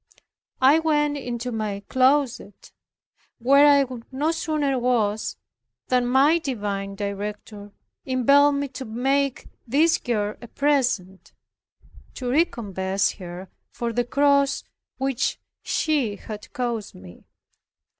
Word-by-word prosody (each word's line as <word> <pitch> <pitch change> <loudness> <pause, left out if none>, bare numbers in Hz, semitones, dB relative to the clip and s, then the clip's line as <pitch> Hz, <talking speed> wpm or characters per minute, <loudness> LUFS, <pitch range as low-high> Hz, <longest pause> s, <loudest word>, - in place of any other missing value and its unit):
I 275 +5 +6
went 295 -2 +1
into 245 -3 -4
my 210 -3 -3
closet, 260 -5 +1 0.7
where 275 +4 +5
I 280 -1 +5 0.3
no 290 +5 0
sooner 305 -5 -1
was, 220 -4 0 0.5
than 250 -1 +2
my 280 +6 +4
divine 205 -8 -4
Director 205 +1 -6 0.3
impelled 280 +3 +4
me 280 0 -1
to 260 0 -7
make 270 +4 -1 0.2
this 310 +7 +3
girl 215 -3 -2
a 240 - -9
present, 245 -10 -1 0.8
to 250 -2 -3
recompense 200 - 0
her 180 0 -9 0.2
for 235 -1 -3
the 245 +1 +1
cross 280 +2 +2 0.3
which 270 0 -1 0.2
she 280 -10 0
had 210 +1 -9
caused 235 -4 -3
me. 90 -1 -14
250 Hz, 110 wpm, -24 LUFS, 210-280 Hz, 0.8 s, I